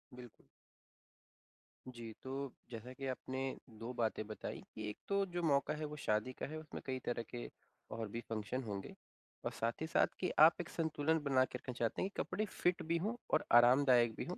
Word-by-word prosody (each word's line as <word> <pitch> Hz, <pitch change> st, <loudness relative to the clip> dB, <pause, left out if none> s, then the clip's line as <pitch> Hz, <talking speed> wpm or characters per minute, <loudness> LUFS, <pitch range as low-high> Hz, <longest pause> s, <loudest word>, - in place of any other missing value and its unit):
बिल्कुल। 125 Hz, -1 st, -9 dB, 1.6 s
जी, 120 Hz, -3 st, -7 dB
तो 135 Hz, 0 st, -4 dB, 0.2 s
जैसा 115 Hz, +2 st, -6 dB
कि 135 Hz, +1 st, -5 dB
आपने 130 Hz, 0 st, -3 dB, 0.4 s
2 115 Hz, +2 st, -4 dB
बातें 110 Hz, -2 st, 0 dB
बताई 110 Hz, -, -5 dB
कि 110 Hz, -1 st, -3 dB
1 105 Hz, -, -6 dB
तो 200 Hz, 0 st, +2 dB
जो 175 Hz, -, 0 dB
मौका 140 Hz, -1 st, +3 dB
है 155 Hz, 0 st, -3 dB
वो 150 Hz, 0 st, -5 dB
शादी 110 Hz, +4 st, +1 dB
का -, -, -4 dB
है 155 Hz, +2 st, -5 dB
उसमें 155 Hz, -1 st, -7 dB
कई 130 Hz, -1 st, -2 dB
तरह 120 Hz, -1 st, -1 dB
के -, -, -5 dB, 0.4 s
और 110 Hz, 0 st, -3 dB
भी 115 Hz, +3 st, -4 dB
फंक्शन 115 Hz, +4 st, -2 dB
होंगे। 100 Hz, -4 st, -5 dB, 0.5 s
और -, -, 0 dB
साथ 115 Hz, +6 st, -2 dB
ही 160 Hz, -, -1 dB
साथ -, -, +4 dB
कि 180 Hz, -, +1 dB
आप 160 Hz, +3 st, +8 dB
एक 170 Hz, -, -8 dB
संतुलन 160 Hz, -1 st, +1 dB
बना 135 Hz, -2 st, +4 dB
के 125 Hz, -, -6 dB
रखना 125 Hz, 0 st, -6 dB
चाहते 115 Hz, -1 st, 0 dB
हैं 190 Hz, -, +1 dB
कि -, -, -2 dB
कपड़े 205 Hz, +4 st, -1 dB
फिट 180 Hz, -3 st, 0 dB
भी 165 Hz, +1 st, +1 dB
हों, 210 Hz, +8 st, -1 dB, 0.2 s
और -, -, +5 dB
आरामदायक 120 Hz, -1 st, +7 dB
भी -, -, -3 dB
हो, 180 Hz, -, -4 dB
130 Hz, 205 wpm, -37 LUFS, 115-155 Hz, 1.6 s, आप